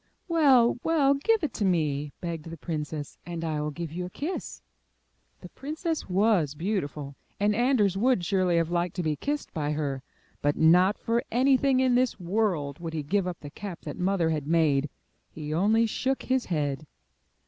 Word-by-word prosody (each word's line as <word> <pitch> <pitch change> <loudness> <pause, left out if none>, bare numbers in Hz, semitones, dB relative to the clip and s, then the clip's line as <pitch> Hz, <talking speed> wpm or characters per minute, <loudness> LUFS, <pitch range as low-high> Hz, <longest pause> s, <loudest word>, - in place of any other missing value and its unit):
''Well, 270 -9 +4
well, 295 -4 +3
give 390 +9 +1
it 310 - -1
to 215 - -2
me, 150 -6 0
begged 165 -3 -4
the 165 0 -8
princess, 150 -2 -5
"and 170 -1 -5
I 155 -2 -1
will 150 - -2
give 160 +1 -6
you 180 +2 -4
a 180 - -5
kiss. 310 - -5 0.8
The - - -10
princess 315 - -4
was 185 -6 +2
beautiful, 150 -6 -3 0.3
and 205 +1 +2
Anders 230 -6 +2
would 235 -4 +2
surely 185 -2 +2
have 165 0 0
liked 175 0 -1
to 180 - -2
be 155 -2 0
kissed 290 - -3
by 150 -2 -1
her, 140 -3 -2 0.4
but 145 0 +1
not 180 +5 +5
for 235 +1 0
anything 260 +1 +3
in 260 -1 +3
this 250 -2 +1
world 175 -7 -1
would 165 -1 -5
he 155 -2 -2
give 190 +5 0
up 175 -2 -5
the 145 -1 -9
cap 195 -2 -7
that 150 - -6
Mother 180 -3 +1
had 150 -3 -2
made. 150 -3 +2 0.4
He 150 -1 -6
only 215 +7 +3
shook 260 +4 -1
his 260 -2 0
head. 150 -3 -2
180 Hz, 180 wpm, -27 LUFS, 155-235 Hz, 0.8 s, not